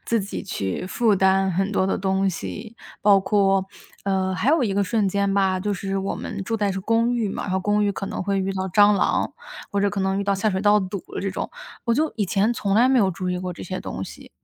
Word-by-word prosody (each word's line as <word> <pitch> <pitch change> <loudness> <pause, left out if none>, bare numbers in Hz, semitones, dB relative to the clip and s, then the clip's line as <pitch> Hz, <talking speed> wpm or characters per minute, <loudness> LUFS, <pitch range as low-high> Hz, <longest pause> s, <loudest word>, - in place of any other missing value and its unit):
自 230 -1 +1
己 200 +1 -5
去 140 - -3
负 215 +1 +2
担 190 0 +3
很 195 +3 -1
多 190 - +2
的 195 - 0
东 190 0 +1
西， 215 +5 -7 0.3
包 200 -1 +6
括 195 -1 +2 0.4
呃 190 -1 0
还 185 +8 0
有 315 -3 +3
一 210 - 0
个 200 +1 +1
瞬 210 0 +1
间 200 +1 0
吧， 190 -2 +2
就 205 +2 -1
是 195 +1 -3
我 195 +1 -2
们 200 -4 -5
住 225 - -1
在 205 -2 0
是 190 - -3
公 230 +4 +2
寓 230 -4 0
嘛， - - -4
然 - - -5
后 190 - +1
公 205 +2 +1
寓 205 - +2
可 195 0 -5
能 - - -4
会 195 +1 0
遇 195 0 -1
到 190 0 -3
蟑 205 +2 +5
螂， - - +1 0.4
或 200 - +1
者 200 0 +2
可 200 -1 -3
能 190 +1 0
遇 - - 0
到 200 - +1
下 195 +3 0
水 190 -2 -1
道 210 0 +5
堵 190 -1 -4
的 - - -3
这 195 - -2
种， 185 - -4 0.3
我 235 - +2
就 310 +5 +1
以 210 - +1
前 200 +5 +1
从 200 -4 -1
来 245 +4 +5
没 265 - +4
有 195 -2 +3
注 185 +1 -4
意 180 - -1
过 180 0 -4
这 - - -9
些 185 +1 -4
东 95 - -5
西。 - - -12
195 Hz, 285 characters per minute, -23 LUFS, 190-210 Hz, 0.4 s, 包